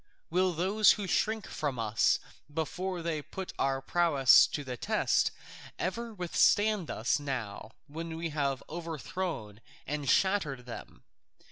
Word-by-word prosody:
Will 185 +1 +2
those 195 +6 +4
who 205 - -4
shrink 215 +3 0
from 145 -5 -3
us 115 -1 +2 0.3
before 175 +3 -3
they 160 -2 -1
put 190 +5 -7
our 135 0 0
prowess 145 -5 +5
to 145 - -4
the 130 -2 -5
test - - +1 0.5
ever 230 +5 -3
withstand 205 0 +2
us 115 +6 0
now 120 -6 -5
when 160 +2 -6
we 165 0 -3
have 140 -3 -1
overthrown 160 - -5 0.2
and 145 -1 -3
shattered 165 -11 +2
them? 120 - -9
160 Hz, 130 wpm, -30 LUFS, 135-185 Hz, 0.5 s, prowess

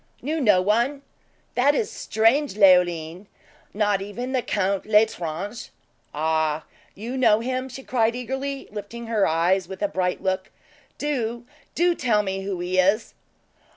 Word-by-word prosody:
"Knew 310 +4 -1
no 205 -7 +4
one 240 +8 +1 0.5
that 280 +4 +3
is 220 - -1
strange, 225 +4 +1
Leoline! 180 -2 +3 0.4
Not 205 -2 +1
even 240 +6 -5
the 260 -1 +1
Count 200 -3 -1
L'Estrange?" 210 -1 0 0.4
"Ah! 155 0 0 0.3
you 235 +5 -6
know 225 -5 +4
him?" 255 +2 -3
she 265 +1 -9
cried 230 -2 +1
eagerly, 265 +3 -4
lifting 215 +3 -7
her 225 -3 +1
eyes 175 +3 +1
with 190 +7 -7
a - - +3
bright 185 -8 -2
look; 190 0 -1 0.5
"do 240 -5 -2 0.3
do 350 +1 +3
tell 230 -9 +1
me 195 -1 -3
who 195 -2 -4
he 180 +1 0
is?" 195 +5 +2
210 Hz, 145 wpm, -24 LUFS, 190-250 Hz, 0.5 s, no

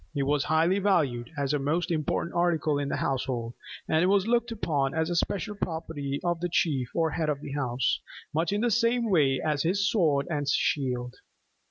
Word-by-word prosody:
It 140 - +1
was 145 +1 +1
highly 165 +5 +2
valued, 145 -12 +1
as 140 0 0
a 145 - +1
most 160 +5 -1
important 160 +1 -1
article 160 -4 +1
in 140 -1 -2
the - - -1
household; 125 -3 -2 0.3
and 160 - +2
it 180 - +3
was 195 0 +3
looked 235 +1 +1
upon 145 -11 -1
as 160 +1 0
the 175 - -1
special 200 +4 -1
property 160 -7 -4
of 175 -1 0
the 175 +1 -2
chief 140 -8 0
or 165 -2 +1
head 155 -1 -1
of 145 -2 -1
the 140 - -7
house 130 -3 0 0.3
much 165 +4 0
in 205 +1 0
the 240 0 +2
same 230 0 +2
way 140 -7 +3
as 150 -2 0
his 200 +6 +1
sword 150 -9 +2
and 145 -4 -2
shield. 125 -3 0
160 Hz, 200 wpm, -27 LUFS, 140-180 Hz, 0.3 s, it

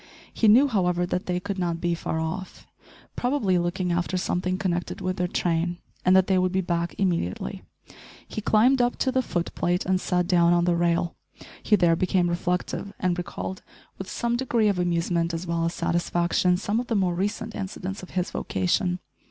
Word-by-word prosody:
He 225 - +2
knew, 245 +7 +7
however, 180 -7 +1
that 180 +1 -3
they 180 0 0
could 200 +1 -4
not 170 -2 -1
be 175 0 0
far 160 -1 -3
off 160 +4 -5 0.5
probably 245 -8 +1
looking 175 +1 -1
after 175 +2 0
something 185 0 -1
connected 180 -3 -2
with 185 -1 -2
their 180 - 0
train 175 0 0 0.3
and 185 - +5
that 190 -1 +6
they 190 -1 +2
would 185 0 +1
be 190 - +1
back 170 -2 -1
immediately; 170 - -1 0.7
he 215 - -5
climbed 240 +6 +4
up 245 0 +1
to 260 - +1
the 260 0 +2
foot 175 -8 -3
plate 175 +1 0
and 185 0 +1
sat 180 -1 +1
down 175 -1 +4
on 175 0 +3
the 175 -1 +2
rail. 170 0 +1 0.5
He 215 - +4
there 175 -4 +4
became 180 0 +1
reflective, 180 +3 -2
and 180 -3 +1
recalled, 180 +1 -5 0.4
with 190 - -6
some 235 0 -1
degree 235 -4 +2
of 195 -3 0
amusement 170 -1 0
as 165 +2 -4
well 170 -1 -1
as 170 - -2
satisfaction, 175 +1 +1
some 205 +4 -1
of 245 - -4
the 230 - 0
more 185 -3 +2
recent 195 +4 -2
incidents 195 0 -5
of 185 - -10
his 180 +1 0
vocation. 180 0 0
180 Hz, 195 wpm, -25 LUFS, 175-195 Hz, 0.7 s, knew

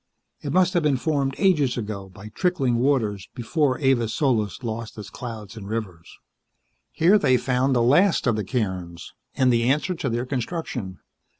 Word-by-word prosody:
It 145 - -4
must 185 0 +3
have 175 - +2
been 150 -4 +2
formed 140 -1 -1
ages 150 -11 +2
ago 105 -4 -5
by 100 +3 -11
trickling 135 - 0
waters 115 -7 0
before 135 +2 0
Avis 125 -5 +1
Solis 120 -5 0
lost 115 -1 -5
its 105 -1 -8
clouds 115 -3 -8
and 100 -3 -8
rivers. 100 -7 -6 0.7
Here 185 +6 +4
they 130 -8 +3
found 130 +1 +1
the 120 - +3
last 170 +10 +4
of 125 -4 +2
the 105 - -2
cairns, 95 -7 -4 0.2
and 130 -2 +3
the 115 - +2
answer 150 +7 +1
to 165 -6 -3
their 120 +2 -2
construction. 125 - -4
125 Hz, 170 wpm, -24 LUFS, 110-140 Hz, 0.7 s, Here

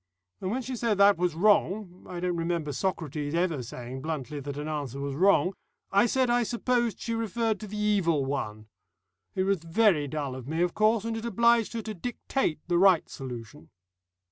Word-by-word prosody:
And 185 - -3
when 255 +5 -2
she 255 +1 -4
said 230 -3 0
that 200 -2 +6
was 175 -3 +1
wrong 195 0 +1
I 180 -1 -5
don't 180 0 -1
remember 165 -3 -2
Socrates 155 -3 -2
ever 170 -5 +1
saying 125 +2 -7
bluntly 150 -2 -4
that 140 0 -6
an 150 +1 -4
answer 145 -4 -4
was 140 0 -3
wrong 185 +4 +3 0.4
I 200 +4 +4
said 260 +2 +2
I 240 0 +3
supposed 240 -1 0
she 230 - -3
referred 225 0 -1
to 215 - -7
the 210 +1 -6
Evil 190 -9 +2
One. 110 -6 -3 0.7
It 185 - +1
was 195 -1 +1
very 165 -3 +3
dull 140 -2 -3
of 130 -1 -8
me, 160 +3 0
of 175 - 0
course, 215 0 +2
and 230 0 -2
it 225 +1 -5
obliged 235 -1 +3
her 230 -1 -3
to 215 - -5
dictate 225 - -2
the 175 -1 +2
right 185 -3 +5
solution. 115 - -8
180 Hz, 195 wpm, -28 LUFS, 150-220 Hz, 0.7 s, that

